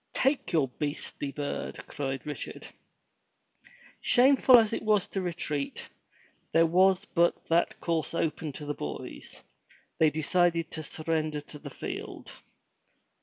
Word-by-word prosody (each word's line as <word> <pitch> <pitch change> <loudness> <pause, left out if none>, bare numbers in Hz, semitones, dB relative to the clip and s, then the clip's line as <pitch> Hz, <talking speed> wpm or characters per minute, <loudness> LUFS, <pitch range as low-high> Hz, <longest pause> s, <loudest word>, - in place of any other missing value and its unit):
"Take 270 +1 +1
your 155 -6 +3
beastly 145 -1 -3
bird," 145 0 -4
cried 135 -2 -4
Richard. 150 -1 -6 1.3
Shameful 260 0 +6
as 225 -1 +3
it - - -1
was 210 -2 +2
to 195 - -2
retreat, 155 -5 -2 0.7
there 165 0 +6
was 185 +3 +4
but 170 -1 +1
that 170 +1 +2
course 165 -1 -1
open 160 -1 -1
to 150 - -7
the 145 - -2
boys. 75 - -7 0.6
They 160 - +6
decided 165 +2 +1
to 160 - -3
surrender 155 -1 -2
the 150 0 -9
field. - - -7
165 Hz, 125 wpm, -29 LUFS, 150-185 Hz, 1.3 s, Shameful